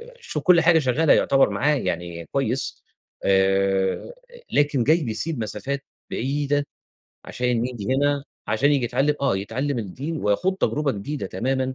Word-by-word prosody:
ب 470 Hz, +2 st, -12 dB
شوف 475 Hz, -, -4 dB
كُلّ 180 Hz, -2 st, +6 dB
حاجة 165 Hz, -1 st, +5 dB
شغّالة 145 Hz, +3 st, +3 dB
يعتبر 135 Hz, -5 st, +4 dB
معاه 145 Hz, +10 st, +1 dB
يعني 85 Hz, -8 st, -4 dB
كويس، 135 Hz, -1 st, -1 dB, 0.4 s
آآ، 95 Hz, -, +1 dB, 0.4 s
لكن 145 Hz, -4 st, +2 dB
جاي 160 Hz, +3 st, +3 dB
بيسيب 125 Hz, +6 st, -2 dB
مسافات 140 Hz, +6 st, -3 dB, 0.3 s
بعيدة، 145 Hz, +3 st, -1 dB, 0.6 s
عشان 125 Hz, -1 st, -1 dB
ييجي 125 Hz, -1 st, -3 dB
هنا 145 Hz, 0 st, +1 dB, 0.2 s
عشان 130 Hz, +7 st, +2 dB
ييجي 135 Hz, -4 st, +1 dB
يتعلّم 135 Hz, +5 st, +1 dB
آه، 140 Hz, -8 st, +2 dB
يتعلّم 125 Hz, +7 st, -2 dB
الدين 130 Hz, -, -5 dB
ويخوض 105 Hz, -, +1 dB
تجربة 150 Hz, -6 st, 0 dB
جديدة 135 Hz, +9 st, -4 dB
تمامًا، 130 Hz, +1 st, -1 dB
135 Hz, 145 wpm, -23 LUFS, 110-145 Hz, 0.6 s, كُلّ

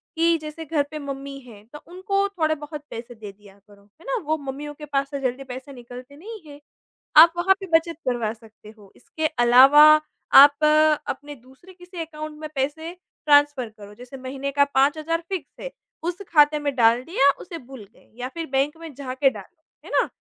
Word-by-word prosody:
कि 330 Hz, 0 st, +2 dB
जैसे 310 Hz, +1 st, -8 dB
घर 300 Hz, -1 st, 0 dB
पे 305 Hz, -, -6 dB
मम्मी 275 Hz, -1 st, -7 dB
हैं 225 Hz, -6 st, -16 dB
तो 295 Hz, -, -9 dB
उनको 395 Hz, +2 st, -1 dB
थोड़े-बहुत 310 Hz, -4 st, -3 dB
पैसे 235 Hz, +1 st, -9 dB
दे 215 Hz, -2 st, -10 dB
दिया 200 Hz, 0 st, -20 dB
करो। 200 Hz, -1 st, -20 dB
है 210 Hz, -, -24 dB
ना? -, -, -2 dB
वो 315 Hz, +1 st, 0 dB
मम्मियों 285 Hz, +1 st, -7 dB
के 300 Hz, +1 st, -11 dB
पास 275 Hz, -1 st, -2 dB
से 280 Hz, -, -4 dB
जल्दी 255 Hz, +1 st, -3 dB
पैसे 260 Hz, +1 st, -9 dB
निकलते 250 Hz, +2 st, -12 dB
नहीं 435 Hz, +7 st, -10 dB
हैं। 285 Hz, -, -13 dB, 0.6 s
आप 330 Hz, +2 st, +9 dB
वहाँ 385 Hz, +2 st, +3 dB
पे 385 Hz, -, -7 dB
बचत 330 Hz, -1 st, -6 dB
करवा 240 Hz, -4 st, -1 dB
सकते 220 Hz, -2 st, -18 dB
हो। 200 Hz, -2 st, -19 dB
इसके 315 Hz, +5 st, -6 dB, 0.2 s
अलावा 265 Hz, +5 st, +7 dB, 0.6 s
आप 285 Hz, +1 st, +5 dB, 0.4 s
अपने 290 Hz, 0 st, -6 dB
दूसरे 265 Hz, +9 st, -19 dB
किसी 355 Hz, -1 st, -10 dB
अकाउंट 310 Hz, -1 st, -8 dB
में 310 Hz, -1 st, -7 dB
पैसे 300 Hz, +5 st, -3 dB, 0.3 s
ट्रांसफर 290 Hz, -4 st, +3 dB
करो। 210 Hz, -1 st, -14 dB
जैसे 250 Hz, +4 st, -12 dB
महीने 265 Hz, +2 st, -6 dB
का 285 Hz, +1 st, +3 dB
5 275 Hz, +3 st, +3 dB
हज़ार 330 Hz, +2 st, -2 dB
फिक्स 380 Hz, -3 st, -5 dB
है -, -, -6 dB, 0.3 s
उस 350 Hz, +3 st, -4 dB
ख़ाते 300 Hz, -1 st, +4 dB
में 285 Hz, -1 st, -2 dB
डाल 235 Hz, 0 st, +3 dB
दिया 280 Hz, -3 st, +2 dB
उसे 340 Hz, -1 st, -8 dB
भूल 260 Hz, -5 st, -12 dB
गए -, -, -26 dB
या 250 Hz, -, -4 dB
फ़िर 335 Hz, -1 st, -5 dB
बैंक 275 Hz, +3 st, 0 dB
में 325 Hz, -2 st, -10 dB
जाके 270 Hz, 0 st, 0 dB
डालो। 265 Hz, -, -13 dB, 0.2 s
है -, -, -11 dB
ना? -, -, +1 dB
285 Hz, 195 wpm, -23 LUFS, 255-320 Hz, 0.6 s, आप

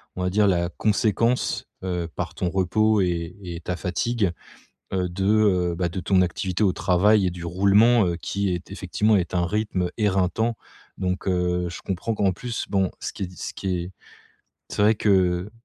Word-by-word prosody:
on 90 Hz, -, -3 dB
va 90 Hz, -, +1 dB
dire, 105 Hz, +1 st, +3 dB
la 85 Hz, -2 st, +1 dB
conséquence, 110 Hz, +5 st, 0 dB, 0.2 s
heu, 90 Hz, -2 st, -2 dB
par -, -, -4 dB
ton 90 Hz, -, -2 dB
repos 100 Hz, +3 st, +2 dB
et 85 Hz, -1 st, -2 dB
et 85 Hz, -2 st, -6 dB
ta 90 Hz, +1 st, -4 dB
fatigue, 95 Hz, +4 st, -1 dB, 0.6 s
heu, 95 Hz, -1 st, 0 dB
de, 90 Hz, +2 st, -4 dB
heu, 95 Hz, -5 st, +3 dB
bah, 90 Hz, 0 st, 0 dB
de 85 Hz, -, -4 dB
ton 95 Hz, 0 st, +3 dB
activité 90 Hz, +2 st, -1 dB
au 95 Hz, -3 st, +3 dB
travail 95 Hz, +3 st, +3 dB
et 90 Hz, -, -1 dB
du 85 Hz, -1 st, -7 dB
roulement, 100 Hz, +6 st, +4 dB
heu, 85 Hz, -1 st, -1 dB
qui 100 Hz, +4 st, -2 dB
est 85 Hz, 0 st, -6 dB
effectivement 105 Hz, +3 st, +1 dB
est 90 Hz, -4 st, 0 dB
un 90 Hz, -1 st, +2 dB
rythme 95 Hz, -2 st, -1 dB
éreintant. 105 Hz, +2 st, +1 dB, 0.4 s
Donc 95 Hz, +1 st, -2 dB
heu, 90 Hz, -1 st, 0 dB
je 85 Hz, -, -8 dB
comprends 95 Hz, +4 st, -2 dB
qu'en 100 Hz, -2 st, +2 dB
plus, 120 Hz, +5 st, -4 dB
bon, 95 Hz, -2 st, +1 dB
ce -, -, -5 dB
qui -, -, -5 dB
est 90 Hz, -, -5 dB
ce -, -, -5 dB
qui 95 Hz, -2 st, -2 dB
est 90 Hz, -, -8 dB, 0.8 s
c'est -, -, -1 dB
vrai 110 Hz, +2 st, +5 dB
que 95 Hz, -2 st, +2 dB
95 Hz, 190 wpm, -24 LUFS, 90-105 Hz, 0.8 s, vrai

